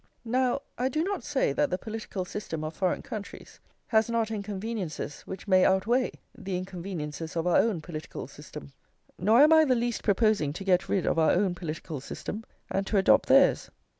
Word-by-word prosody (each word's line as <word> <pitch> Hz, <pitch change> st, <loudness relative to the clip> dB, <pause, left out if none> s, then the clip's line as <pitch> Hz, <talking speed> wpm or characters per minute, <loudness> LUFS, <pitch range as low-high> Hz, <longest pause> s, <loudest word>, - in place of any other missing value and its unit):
Now 255 Hz, +3 st, +1 dB, 0.2 s
I 255 Hz, +1 st, +1 dB
do 310 Hz, +4 st, 0 dB
not 390 Hz, 0 st, -2 dB
say 275 Hz, -, 0 dB
that 150 Hz, -, +1 dB
the 180 Hz, -, -1 dB
political 215 Hz, -3 st, -5 dB
system 170 Hz, -5 st, -5 dB
of 155 Hz, +1 st, -4 dB
foreign 185 Hz, -3 st, 0 dB
countries 210 Hz, -2 st, -8 dB, 0.3 s
has 220 Hz, 0 st, +2 dB
not 230 Hz, -1 st, 0 dB
inconveniences 200 Hz, -6 st, -4 dB
which 190 Hz, +2 st, -7 dB
may 185 Hz, -1 st, +5 dB
outweigh 230 Hz, +7 st, +2 dB, 0.2 s
the 190 Hz, -1 st, -4 dB
inconveniences 170 Hz, -4 st, -6 dB
of 165 Hz, 0 st, -1 dB
our 180 Hz, -, +4 dB
own 210 Hz, -7 st, +2 dB
political 155 Hz, -1 st, -7 dB
system; 70 Hz, -, -11 dB, 0.5 s
nor 220 Hz, +7 st, +5 dB
am 310 Hz, +2 st, +6 dB
I 315 Hz, 0 st, +7 dB
the 265 Hz, -4 st, +3 dB
least 240 Hz, -1 st, -1 dB
proposing 205 Hz, -8 st, +2 dB
to 185 Hz, -, -6 dB
get 185 Hz, -2 st, +2 dB
rid 190 Hz, -, +1 dB
of -, -, +1 dB
our 160 Hz, -, +4 dB
own 185 Hz, 0 st, +2 dB
political 160 Hz, -4 st, -6 dB
system 215 Hz, +9 st, -6 dB, 0.3 s
and 195 Hz, 0 st, -1 dB
to 210 Hz, -, +1 dB
adopt 190 Hz, -, +4 dB
theirs. -, -, +5 dB
195 Hz, 185 wpm, -28 LUFS, 175-230 Hz, 0.5 s, I